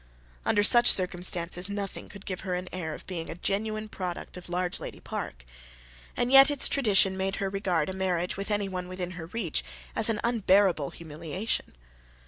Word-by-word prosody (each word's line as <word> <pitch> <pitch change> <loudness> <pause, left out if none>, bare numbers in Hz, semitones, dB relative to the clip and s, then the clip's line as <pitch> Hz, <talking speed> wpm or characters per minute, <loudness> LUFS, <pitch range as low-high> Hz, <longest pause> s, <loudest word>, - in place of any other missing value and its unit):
Under 205 - +3
such 240 +3 +8
circumstances 180 0 +1
nothing 200 -1 -5
could 200 -1 -12
give 185 -2 -4
her 180 -1 -2
an 180 +1 -4
air 160 -4 -4
of - - -12
being 170 -3 -5
a - - -5
genuine 215 +4 -2
product 180 -4 -6
of 180 - -10
Largelady 180 0 -3
Park. - - -6 0.7
And 245 +1 +1
yet 270 +1 +9
its 290 -2 +3
tradition 200 -7 +4
made 190 +1 -1
her 195 -1 -2
regard 195 -4 0
a 190 - -4
marriage 180 -2 -1
with 200 +2 -5
anyone 195 -3 -2
within 185 -1 -5
her 170 -3 -8
reach 175 - -2 0.3
as - - +2
an 215 -2 +1
unbearable 195 - +3
humiliation. 165 - -4
190 Hz, 170 wpm, -28 LUFS, 175-205 Hz, 0.7 s, yet